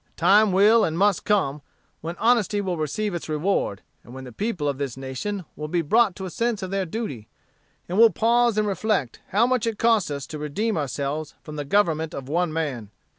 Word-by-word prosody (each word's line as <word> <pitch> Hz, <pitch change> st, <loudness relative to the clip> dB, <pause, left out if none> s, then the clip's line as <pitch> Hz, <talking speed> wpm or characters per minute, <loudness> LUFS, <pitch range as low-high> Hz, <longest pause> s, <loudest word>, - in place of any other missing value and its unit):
The -, -, -39 dB
time 200 Hz, +4 st, +5 dB
will 210 Hz, +4 st, +5 dB
and 160 Hz, -3 st, -1 dB
must 200 Hz, 0 st, +2 dB
come, 150 Hz, -9 st, +1 dB, 0.4 s
when 165 Hz, +2 st, -5 dB
honesty 225 Hz, -3 st, +2 dB
will 190 Hz, -3 st, -2 dB
receive 185 Hz, +7 st, -2 dB
its 170 Hz, -2 st, -5 dB
reward, 155 Hz, -, -1 dB, 0.2 s
and 120 Hz, -, -13 dB
when 130 Hz, -, -8 dB
the 125 Hz, -, -9 dB
people 185 Hz, -, -2 dB
of 140 Hz, -1 st, -2 dB
this 135 Hz, -3 st, -4 dB
nation 135 Hz, +9 st, -5 dB
will 150 Hz, -, -5 dB
be 170 Hz, +1 st, 0 dB
brought 215 Hz, +4 st, +3 dB
to 190 Hz, -, -6 dB
a 185 Hz, -, -6 dB
sense 230 Hz, -1 st, -1 dB
of 185 Hz, -, -5 dB
their 195 Hz, -2 st, -1 dB
duty, 160 Hz, -, -5 dB, 0.6 s
and 185 Hz, +4 st, -1 dB
will 230 Hz, 0 st, +8 dB
pause 235 Hz, 0 st, +2 dB
and 210 Hz, 0 st, +2 dB
reflect 200 Hz, -, -1 dB
how 210 Hz, +4 st, +3 dB
much 250 Hz, -2 st, 0 dB
it 225 Hz, -2 st, -2 dB
cost 225 Hz, -6 st, +2 dB
us 140 Hz, -2 st, -4 dB
to 155 Hz, -, -7 dB
redeem 200 Hz, +10 st, -2 dB
ourselves 145 Hz, +1 st, -3 dB
from 150 Hz, -, -9 dB
the 145 Hz, -1 st, -4 dB
government 160 Hz, -3 st, +1 dB
of 135 Hz, -2 st, -7 dB
one 170 Hz, +3 st, 0 dB
man. 140 Hz, -10 st, -3 dB
180 Hz, 215 wpm, -24 LUFS, 150-210 Hz, 0.6 s, will